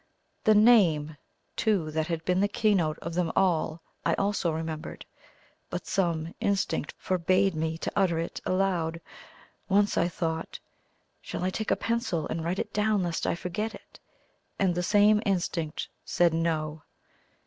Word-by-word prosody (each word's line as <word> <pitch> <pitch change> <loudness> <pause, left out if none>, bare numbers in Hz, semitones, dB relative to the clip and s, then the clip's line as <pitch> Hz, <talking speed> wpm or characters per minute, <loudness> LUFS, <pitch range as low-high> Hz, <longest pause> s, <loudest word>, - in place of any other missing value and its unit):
The 215 - +6
NAME, 180 -10 +5 0.4
too, 195 -8 +1
that 160 0 -1
had 165 -1 -3
been 180 0 +2
the 200 - +3
key 210 +1 +2
note 160 -5 +1
of 170 - -4
them 170 -1 0
all 165 -3 +1 0.2
I - - +2
also 200 -4 0
remembered, 160 -1 -5 0.6
but 180 - -4
some 170 -3 -1
instinct 195 -6 0
forbade 185 +1 +1
me 160 0 -2
to - - -3
utter 185 -4 +2
it 165 +1 -4
aloud. 180 -3 0 0.7
Once 205 +1 +3
I 170 - +3
thought, 165 -2 -3 0.6
"Shall - - -5
I 185 - +1
take 220 +3 -3
a - - +4
pencil 230 - -1
and 160 - -3
write 175 +3 -1
it - - -4
down 210 -2 +2
lest 170 -2 -2
I - - +1
forget 210 +6 -3
it?" - - -16 0.6
and 190 -3 +2
the 175 - -1
same 210 +3 +4
instinct 170 -5 -1 0.2
said 175 -2 +2
"No." 160 -2 -1
175 Hz, 160 wpm, -28 LUFS, 160-200 Hz, 0.7 s, The